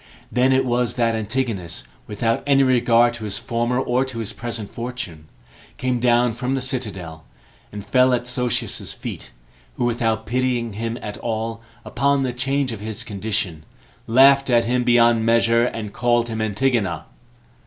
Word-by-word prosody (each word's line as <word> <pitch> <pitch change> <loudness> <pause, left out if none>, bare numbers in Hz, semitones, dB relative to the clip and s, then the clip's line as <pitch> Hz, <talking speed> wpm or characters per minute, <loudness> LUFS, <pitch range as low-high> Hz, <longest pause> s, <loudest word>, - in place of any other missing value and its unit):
Then 125 +1 +3
it 130 0 +3
was 120 -1 0
that 115 -2 +1
Antigonus, 110 - -2 0.2
without 115 +2 -1
any 135 -1 +5
regard 120 -2 +4
to 115 -3 -7
his 100 -1 -1
former 120 +2 -1
or 125 0 +1
to 130 -3 -8
his 110 -3 -3
present 115 -3 -5
fortune, 115 -11 -6 0.5
came 125 -1 -1
down 120 0 +3
from 125 +3 -2
the 135 - 0
citadel, 100 - -4 0.5
and 105 -1 -8
fell 130 0 +4
at 125 -1 0
Sosius's 125 -1 -1
feet, - - -7 0.5
who - - -1
without 115 -2 0
pitying 120 -1 -1
him 115 +3 -3
at 105 0 -6
all, 115 0 -3 0.2
upon 140 +2 +1
the 125 -2 -2
change 135 +1 0
of 110 - -6
his 110 +1 -5
condition, 100 -6 -3 0.4
laughed 135 +3 +5
at 120 -1 +4
him 125 +1 +1
beyond 120 -1 +4
measure, 115 +1 +3
and 110 -4 -4
called 120 -1 +1
him 110 -1 -3
Antigona. 110 0 0
120 Hz, 160 wpm, -21 LUFS, 110-125 Hz, 0.5 s, any